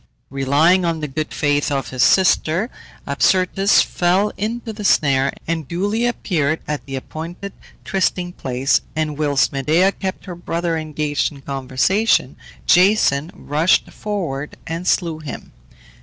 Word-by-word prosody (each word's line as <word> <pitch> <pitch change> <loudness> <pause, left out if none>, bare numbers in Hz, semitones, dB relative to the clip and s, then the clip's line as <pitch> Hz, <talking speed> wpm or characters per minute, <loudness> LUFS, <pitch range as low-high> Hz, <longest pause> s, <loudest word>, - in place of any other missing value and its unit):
Relying 145 +7 +3
on 165 -2 -1
the 150 - -3
good 155 +2 -4
faith 145 0 0
of 135 -1 -2
his 130 -1 -2
sister, 185 - +3 0.3
Absyrtus 190 +2 +3
fell 185 +4 +1
into 225 +2 -4
the 210 0 -7
snare, 135 -7 +3
and 165 -3 -3
duly 205 - 0
appeared 160 -10 -1
at 150 -4 -3
the 135 - -5
appointed 165 +8 -7 0.3
trysting 180 -2 -1
place; 130 -1 0
and 155 -1 -1
whilst 145 -2 +1
Medea 155 +8 +2
kept 190 -1 -5
her 185 - -6
brother 170 -1 -2
engaged 150 -2 -1
in 140 -2 -13
conversation, 135 - +1 0.3
Jason 180 -6 +4
rushed 155 +5 +1
forward 170 -9 -4
and 165 +2 -5
slew 165 -3 +1
him. 150 -4 -8
160 Hz, 135 wpm, -20 LUFS, 145-185 Hz, 0.3 s, Jason